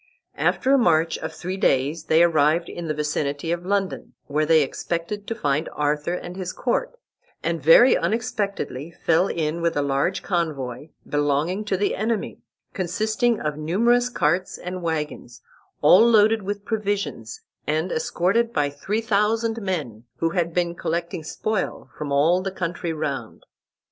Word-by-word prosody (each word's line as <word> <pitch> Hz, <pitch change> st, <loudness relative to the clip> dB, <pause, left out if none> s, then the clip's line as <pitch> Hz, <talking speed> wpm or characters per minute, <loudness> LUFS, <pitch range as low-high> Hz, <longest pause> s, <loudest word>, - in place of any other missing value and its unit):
After 265 Hz, -, +2 dB
a 275 Hz, -, +5 dB
march 165 Hz, -6 st, +2 dB
of -, -, -5 dB
three 185 Hz, +2 st, -5 dB
days 150 Hz, 0 st, +1 dB
they 160 Hz, +2 st, +5 dB
arrived 165 Hz, 0 st, +3 dB
in 170 Hz, -1 st, -6 dB
the 155 Hz, -, 0 dB
vicinity 150 Hz, +1 st, -2 dB
of 175 Hz, +1 st, -3 dB
London, 200 Hz, -1 st, -2 dB
where 150 Hz, +1 st, 0 dB
they 160 Hz, -1 st, +5 dB
expected 170 Hz, +8 st, -4 dB
to 225 Hz, -, -2 dB
find 145 Hz, -1 st, 0 dB
Arthur 150 Hz, +3 st, 0 dB
and 180 Hz, 0 st, -7 dB
his 185 Hz, -1 st, -4 dB
court, 250 Hz, -, -1 dB, 0.5 s
and 165 Hz, -1 st, -1 dB
very 165 Hz, -, +7 dB
unexpectedly 200 Hz, -, -2 dB
fell 170 Hz, +2 st, +1 dB
in 160 Hz, -1 st, -2 dB
with 165 Hz, -2 st, 0 dB
a 145 Hz, -, +2 dB
large 140 Hz, +7 st, 0 dB
convoy 150 Hz, -6 st, -2 dB, 0.2 s
belonging 145 Hz, +7 st, 0 dB
to 195 Hz, -3 st, 0 dB
the 205 Hz, -, 0 dB
enemy, 220 Hz, +1 st, -2 dB, 0.3 s
consisting 215 Hz, +4 st, 0 dB
of 150 Hz, -1 st, -3 dB
numerous 235 Hz, +10 st, +2 dB
carts 180 Hz, -4 st, 0 dB
and 180 Hz, +1 st, -6 dB
wagons, 150 Hz, -7 st, -4 dB, 0.4 s
all 165 Hz, +8 st, +7 dB
loaded 220 Hz, -1 st, +5 dB
with 200 Hz, +1 st, -5 dB
provisions, 210 Hz, -, -3 dB, 0.3 s
and 155 Hz, +4 st, 0 dB
escorted 200 Hz, +8 st, +1 dB
by 145 Hz, -5 st, 0 dB
three 200 Hz, +10 st, -2 dB
thousand 225 Hz, +1 st, +1 dB
men, 145 Hz, -, -4 dB
who 165 Hz, 0 st, 0 dB
had 170 Hz, -2 st, 0 dB
been 175 Hz, 0 st, 0 dB
collecting 170 Hz, 0 st, -3 dB
spoil 210 Hz, +6 st, -3 dB
from 150 Hz, -2 st, -5 dB
all 160 Hz, +6 st, +3 dB
the 190 Hz, -, -2 dB
country 170 Hz, -2 st, -3 dB
round. 140 Hz, -7 st, -4 dB
170 Hz, 155 wpm, -23 LUFS, 150-200 Hz, 0.5 s, very